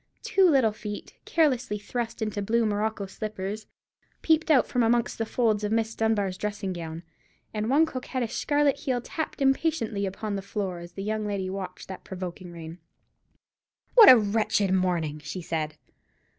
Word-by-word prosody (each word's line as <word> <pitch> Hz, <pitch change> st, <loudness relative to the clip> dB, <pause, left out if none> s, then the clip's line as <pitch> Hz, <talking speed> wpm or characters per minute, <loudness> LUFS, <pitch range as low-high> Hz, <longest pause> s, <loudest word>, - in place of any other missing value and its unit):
Two 380 Hz, -2 st, +4 dB
little 265 Hz, -8 st, +4 dB
feet, 210 Hz, -1 st, -7 dB
carelessly 255 Hz, -9 st, +1 dB
thrust 230 Hz, +2 st, -4 dB
into 210 Hz, -1 st, -2 dB
blue 230 Hz, +3 st, +1 dB
morocco 210 Hz, 0 st, -1 dB
slippers, 210 Hz, +1 st, -5 dB, 0.6 s
peeped 320 Hz, 0 st, +3 dB
out 280 Hz, -5 st, +5 dB
from 250 Hz, -, 0 dB
amongst 235 Hz, +1 st, +1 dB
the 225 Hz, -, -1 dB
folds 220 Hz, -4 st, +1 dB
of 210 Hz, -, -1 dB
Miss 225 Hz, 0 st, +1 dB
Dunbar's 205 Hz, -5 st, 0 dB
dressing 205 Hz, -2 st, -3 dB
gown, 165 Hz, -1 st, -6 dB, 0.5 s
and 215 Hz, +1 st, -2 dB
one 295 Hz, +5 st, +5 dB
coquettish 255 Hz, -4 st, -4 dB
scarlet 290 Hz, +1 st, +2 dB
heel 265 Hz, -4 st, -1 dB
tapped 305 Hz, +3 st, -4 dB
impatiently 270 Hz, -8 st, +1 dB
upon 200 Hz, +2 st, -4 dB
the 195 Hz, -, -3 dB
floor 195 Hz, -2 st, -4 dB
as 175 Hz, 0 st, -10 dB
the 195 Hz, -, -6 dB
young 215 Hz, 0 st, -2 dB
lady 195 Hz, -2 st, -2 dB
watched 195 Hz, -1 st, -6 dB
that 190 Hz, -, -8 dB
provoking 180 Hz, -1 st, -7 dB
rain. 165 Hz, 0 st, -9 dB, 1.1 s
"What 460 Hz, -4 st, +10 dB
a 255 Hz, -, +11 dB
wretched 210 Hz, -2 st, +1 dB
morning!" 175 Hz, -5 st, 0 dB
she 150 Hz, +4 st, -6 dB
said. 155 Hz, -3 st, -3 dB
210 Hz, 160 wpm, -27 LUFS, 190-240 Hz, 1.1 s, a